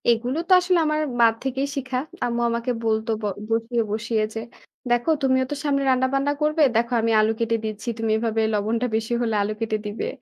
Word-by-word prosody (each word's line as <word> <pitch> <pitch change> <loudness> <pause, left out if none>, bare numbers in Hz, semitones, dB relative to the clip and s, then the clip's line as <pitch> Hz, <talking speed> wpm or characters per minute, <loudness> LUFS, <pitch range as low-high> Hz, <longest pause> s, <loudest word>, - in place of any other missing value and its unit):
এগুলো 240 +4 +1
তো - - -4
আসলে 360 -1 +2
আমার 305 0 +1 0.2
মার 230 -1 +6
থেকেই 270 +1 -1
শিখা। 260 -2 -3 0.3
আম্মু 240 0 -1
আমাকে 235 +2 -1
বলতো 220 0 0
ব - - -13 0.3
বসিয়ে, 230 +1 0
বসিয়ে 220 0 0
যে, 225 - -4 0.5
"দেখো 240 +6 +2
তুমিও 260 -1 +3
তো - - -1
সামনে 280 -2 +1
রান্নাবান্না 265 +2 +2
করবে। 305 +1 +1
দেখো 235 +2 +1
আমি 230 0 +1
আলু 215 +1 +3
কেটে 230 0 +1
দিচ্ছি। 215 +2 -4
তুমি 225 -1 0
এভাবে 225 0 0
লবণটা 220 +4 0
বেশি 225 +1 -1
হলে 225 -2 0
আলু 205 +1 -1
কেটে 220 -1 -1
দিবে। 210 +1 -3
235 Hz, 195 wpm, -23 LUFS, 225-260 Hz, 0.5 s, মার